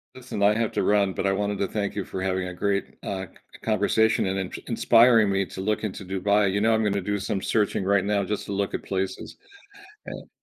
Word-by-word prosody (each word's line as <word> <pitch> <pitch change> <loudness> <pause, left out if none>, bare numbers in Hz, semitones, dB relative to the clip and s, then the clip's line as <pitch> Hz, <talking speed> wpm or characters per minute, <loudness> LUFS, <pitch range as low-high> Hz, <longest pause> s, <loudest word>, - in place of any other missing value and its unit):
Listen. 125 -5 -4
I 105 +1 +5
have 115 -1 0
to - - 0
run, 100 -2 +2
but - - -3
I 95 - +3
wanted 100 +1 -1
to 100 - -1
thank 100 -1 -3
you 100 -3 -3
for 95 - -6
having 95 -1 -1
a - - -7
great, 100 +2 0 0.2
uh, 95 -1 -4 0.3
c - - -14
conversation 110 -2 +2
and 95 +1 -1
int 95 -2 -4
inspiring 115 -3 +5
me 95 0 +1
to - - -9
look 105 +2 -1
into 100 -2 -5
Dubai. 100 +2 +1
You 100 - 0
know, 110 +1 +3
I'm 110 0 +2
gonna 100 -1 0
do 105 +2 -1
some 100 0 -3
searching 105 -2 0
right 100 0 +2
now 100 -1 +1
just 105 +2 -3
to - - -7
look 100 0 -1
at - - -5
places 95 0 -4 0.7
and - - -9
100 Hz, 235 wpm, -25 LUFS, 95-105 Hz, 0.7 s, I